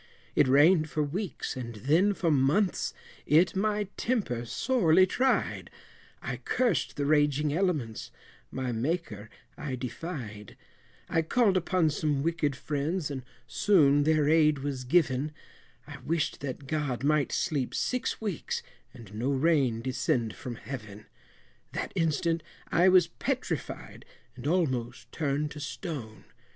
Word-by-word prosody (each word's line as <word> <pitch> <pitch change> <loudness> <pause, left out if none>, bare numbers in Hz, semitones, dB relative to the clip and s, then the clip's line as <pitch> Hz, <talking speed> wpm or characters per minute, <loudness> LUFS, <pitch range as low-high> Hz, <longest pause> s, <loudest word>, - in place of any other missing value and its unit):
It 145 - +4
rained 155 +4 +5
for 150 - 0
weeks, 170 - -4
and 120 -3 -6
then 160 - +2
for 170 -4 +1
months, 150 +8 +2 0.4
it 165 +6 +4
my 210 +1 +1
temper 195 - -1
sorely 185 - +3
tried, 255 +7 0 0.5
I - - -3
cursed 250 -2 0
the 145 - -1
raging 145 0 +2
elements, 155 - -1 0.4
my 130 -1 -3
Maker 115 - -3 0.3
I 140 -3 -3
defied, 120 - -7 0.5
I 165 - +1
called 200 +4 +2
upon 180 -3 +2
some 145 -2 0
wicked 160 -4 0
friends, 150 +4 -2
and 135 -2 -4 0.2
soon 145 -8 +4
their 155 0 +3
aid 155 -1 +4
was 135 -3 -3
given, 145 -1 +2 0.5
I - - -9
wished 165 0 -1
that 140 0 -6
God 135 -4 -2
might 150 -1 +2
sleep 145 -8 -1
six 255 0 -1
weeks, 205 -7 -3 0.3
and 115 -5 -12
no 115 +5 -1
rain 135 -5 +2
descend 120 -3 0
from 125 -2 -6
Heaven! 105 -4 -8 0.7
That - - -3
instant 165 +1 +1 0.3
I 180 +3 +5
was 185 -2 +6
petrified, 170 - -4 0.3
and 125 +2 -6
almost 130 -9 -1
turned 150 -1 -1
to 150 - -8
stone! 145 - -6
150 Hz, 130 wpm, -29 LUFS, 130-170 Hz, 0.7 s, was